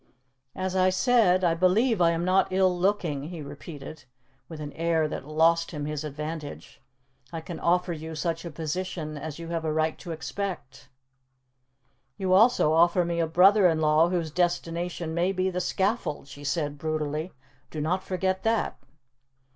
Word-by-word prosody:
"As 185 0 -3
I 185 0 +4
said, 190 -2 +3
I 170 -2 +3
believe 185 +6 +2
I 170 - +5
am 170 +1 -1
not 185 +1 +3
ill 185 -1 +2
looking," 175 -6 0
he 170 -4 -7
repeated, 145 0 -9 0.4
with 160 -2 -8
an 145 -1 -6
air 165 -1 +1
that 140 - -6
lost 165 +2 +3
him 150 -3 -5
his 150 0 -3
advantage. 150 0 -7 0.5
"I 165 - -4
can 160 +1 -7
offer 180 0 +1
you 160 0 -7
such 165 +1 -2
a 170 - -5
position 160 0 -4
as 150 0 -6
you 165 0 -8
have 165 -1 -2
a 160 - -1
right 155 0 0
to 175 - -7
expect." 160 -6 -5 1.3
"You 185 -1 0
also 200 -6 +5
offer 170 +2 +4
me 170 0 -2
a 165 - +1
brother 185 +4 +6
in 160 -2 +1
law 155 +2 +4
whose 170 -3 -1
destination 170 -1 -1
may 175 +3 +1
be 185 0 0
the 180 0 -2
scaffold," 190 -6 -1
she 145 +1 -11
said 145 0 -2
brutally; 155 +2 -2 0.4
"do 155 - -6
not 170 +5 0
forget 190 0 -1
that." 225 -1 0
170 Hz, 170 wpm, -27 LUFS, 155-185 Hz, 1.3 s, brother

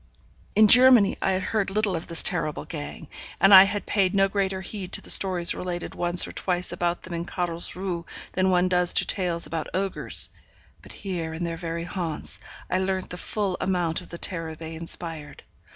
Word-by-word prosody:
In 215 +1 +6
Germany, 250 -3 +7
I 190 - +1
had 185 0 -2
heard 210 -1 -1
little 205 -1 -1
of 165 - -5
this 165 - +1
terrible 160 -6 -1
gang, 155 0 -8 0.3
and 195 +1 +5
I 190 0 +11
had 205 +1 -4
paid 195 -2 0
no 195 0 +4
greater 195 -1 -2
heed 190 -1 -7
to - - +2
the - - 0
stories 180 -3 +4
related 175 -1 -5
once 175 0 +2
or - - -8
twice 180 -1 -3
about 175 0 -2
them 185 - -9
in 170 0 -3
Carlsruhe 175 0 -4 0.2
than 185 0 0
one 180 0 +2
does 180 -1 +4
to - - +2
tales 175 -3 0
about 160 -2 -4
ogres. 195 +1 +1 0.5
But - - -10
here 170 -5 -5
in 170 - -5
their 170 -1 -3
very 165 0 -5
haunts, 170 -3 -5 0.3
I 185 - -1
learnt 190 0 -2
the - - -4
full 195 -1 -3
amount 175 -3 -1
of 180 - -14
the 170 - -8
terror 165 -3 -3
they 160 +1 -9
inspired. 160 -2 -3
180 Hz, 195 wpm, -24 LUFS, 170-190 Hz, 0.5 s, I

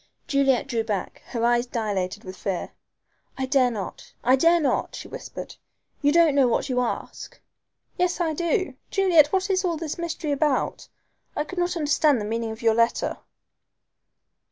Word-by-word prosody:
Juliet 275 -3 +2
drew 230 -2 -1
back, 205 -4 -4
and - - -15
her 235 -1 0
eyes 240 +1 +2
dilated 205 -6 -2
with 185 0 -8
fear. 190 -1 -3 0.7
"I 265 - -1
dare 260 -1 +3
not 215 -5 -7
I 255 +2 +5
dare 335 +5 +4
not," 280 -5 0
she - - -8
whispered. - - -8 0.4
"You 290 0 +4
don't 330 -2 +5
know 275 -2 +4
what 240 - 0
you 250 -1 +1
ask." 245 - -4 0.6
"Yes 360 0 +1
I 330 -2 0
do. 340 -1 0 0.2
Juliet, 360 -7 +5
what 385 +1 +1
is 375 0 +1
all 345 -3 0
this 320 0 -5
mystery 335 -2 -3
about? 285 -1 0 0.5
I - - 0
could 360 +4 -6
not 350 0 0
understand 295 -3 +3
the 210 - -3
meaning 225 +1 -2
of 220 +1 -8
your 225 -1 +4
letter." 230 +1 +1
275 Hz, 175 wpm, -25 LUFS, 230-335 Hz, 0.7 s, I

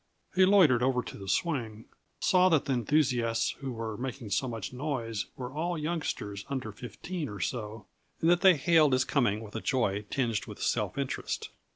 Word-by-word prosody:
He 185 0 +5
loitered 170 -12 +6
over 125 -1 +2
to - - -8
the 95 - -8
swing, 115 - -1 0.4
saw 185 0 +5
that 160 -5 +3
the 135 - 0
enthusiasts 120 -3 +1
who 135 -2 -4
were 110 -2 -4
making 125 -4 -5
so 115 +7 +1
much 115 -2 -5
noise 125 -6 -3
were 125 0 -6
all 170 +3 -2
youngsters 150 -11 -3
under 130 -6 -3
fifteen 140 - -6
or 105 - -7
so 105 +2 -4 0.3
and 160 - +1
that 175 +1 +4
they 190 -3 +7
hailed 155 -1 +4
his 130 0 +3
coming 115 -7 +1
with 105 0 -11
a 110 - -3
joy 105 -6 0
tinged 115 -6 -1
with - - -9
self - - -1
interest. - - -3
125 Hz, 185 wpm, -29 LUFS, 110-155 Hz, 0.4 s, they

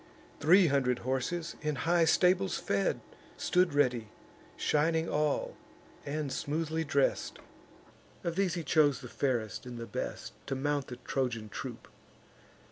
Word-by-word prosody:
Three 180 +5 +6
hundred 135 -5 +2
horses, 160 +6 -2
in 150 -1 -1
high 165 +5 +3
stables 180 +3 +3
fed, 100 -1 0 0.4
Stood 180 -4 +2
ready, 125 -6 +2 0.5
shining 160 +2 +1
all, 150 -1 0 0.5
and 145 -1 -2
smoothly 160 +3 -1
dress'd: 140 -2 0 0.9
Of 170 -1 -2
these 190 -2 +1
he 170 - -3
chose 145 -2 +3
the 125 - -8
fairest 120 -4 -2
and 120 -1 -7
the 115 - -5
best, 105 - -5
To 135 - -1
mount 145 0 -1
the 125 - -6
Trojan 125 -3 -2
troop. - - -7
145 Hz, 130 wpm, -31 LUFS, 130-165 Hz, 0.9 s, Three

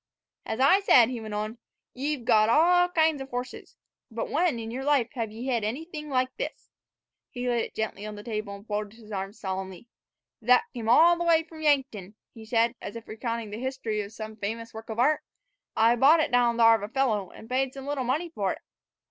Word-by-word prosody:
"As 220 - -3
I 280 +9 +6
said," 250 - +6
he 245 -3 -5
went 215 -1 -6
on, 215 +2 -4 0.3
"y' 285 +4 -1
've 245 -5 -12
got 215 0 +4
all 355 +6 +5
kinds 320 -4 +2
of 270 - -7
horses; 245 0 -6 0.3
but 230 -1 -5
when 320 -4 +1
in 225 0 -6
yer 260 +3 -4
life 275 -5 +2
hev 230 -5 -3
ye 225 +3 -7
hed 240 -4 0
anything 300 +7 -5
like 255 -1 0
this?" - - -6 0.6
He 250 -1 -5
laid 240 -2 +1
it - - -13
gently 215 -1 -3
on 210 - -7
the 205 - -9
table, 215 -3 -4
and 200 +1 -13
folded 210 0 -4
his 220 -2 -14
arms 195 +1 -5
solemnly. 190 +1 -5 0.6
"Thet 250 +2 +5
came 225 -2 -4
all 340 +8 +6
the - - 0
way 330 -1 +4
from 320 -1 -12
Yankton," 260 -10 0 0.2
he 225 -1 -12
said, 230 +1 +2
as - - -7
if 230 -1 -9
recounting 230 -1 -4
the 210 - -6
history 260 -5 -2
of 200 0 -8
some 220 -1 -8
famous 225 +2 -5
work 220 +1 -10
of 220 - -5
art. 290 +6 +3 0.5
"I 225 +2 +4
bought 280 +7 +6
it 310 - 0
down 240 -1 +3
thar 230 -1 +7
of 220 - -4
a 205 +2 -6
feller, 220 -9 0
an' 220 - -12
paid 260 +2 0
some 270 -1 -8
little 285 -2 -2
money 295 +8 -1
fer 195 - -1
it." - - -12
235 Hz, 225 wpm, -27 LUFS, 220-270 Hz, 0.6 s, thar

